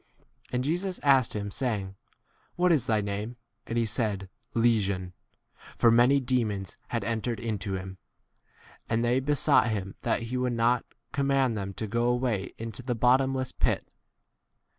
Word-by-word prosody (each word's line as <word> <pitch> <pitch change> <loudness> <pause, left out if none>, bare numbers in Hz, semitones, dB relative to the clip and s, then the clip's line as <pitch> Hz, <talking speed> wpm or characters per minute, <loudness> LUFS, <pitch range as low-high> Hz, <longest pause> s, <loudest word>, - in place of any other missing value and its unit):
80 - - -39
And 125 0 +1
Jesus 175 +6 -1
asked 135 -5 +4
him 100 -1 -3
saying, 100 -6 -2 0.6
What 180 0 +3
is 135 -7 +3
thy 110 -3 +2
name? 105 +4 -4 0.3
And 115 - -2
he 115 - +2
said, 105 -4 -2 0.2
Legion: 100 -6 +1 0.6
for 115 - +5
many 125 +4 +5
demons 115 -7 -1
had - - -2
81 - - -1
entered 115 +1 -2
into 105 -4 -3
him. 95 0 -7 0.9
And 115 +1 +1
they 120 +2 +3
be 145 +2 0
sought 125 - +4
him 95 -3 -3
that 115 0 0
he 120 +2 -3
would 125 -1 0
not 120 +1 +2 0.3
command 135 -3 +2
them 100 -2 -4
to 110 - -3
go 120 +3 0
away 120 -5 +1
into 115 +3 -6
32 125 - -18
the 125 - 0
bottomless 130 +2 +2
pit. - - 0
115 Hz, 165 wpm, -28 LUFS, 105-130 Hz, 0.9 s, for